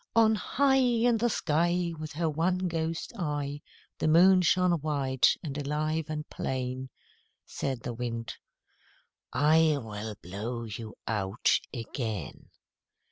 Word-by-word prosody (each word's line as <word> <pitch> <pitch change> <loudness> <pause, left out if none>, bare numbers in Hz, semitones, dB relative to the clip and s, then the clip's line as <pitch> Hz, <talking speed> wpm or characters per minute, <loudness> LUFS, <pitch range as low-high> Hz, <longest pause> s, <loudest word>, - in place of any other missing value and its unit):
On 225 -1 +6
high 270 +6 +2
In 240 -2 +3
the 240 +2 +1
sky 170 0 +1
With 155 -1 -6
her 165 +2 0
one 180 +4 0
ghost 165 +2 -3
eye, 145 -3 -2 0.4
The - - +1
Moon 180 +4 +6
shone 180 +1 +3
white 135 -4 +2
and 145 -4 -5
alive 155 +2 -1
and 150 -1 -4
plain. 130 0 -3 0.6
Said 130 -4 -3
the 120 - -4
Wind 115 -1 -4 1.0
"I 155 +3 +4
will 105 -2 -6
blow 110 +7 -4
you 110 0 -7
out 105 0 0 0.2
again." 115 - -5
150 Hz, 125 wpm, -29 LUFS, 125-175 Hz, 1.0 s, On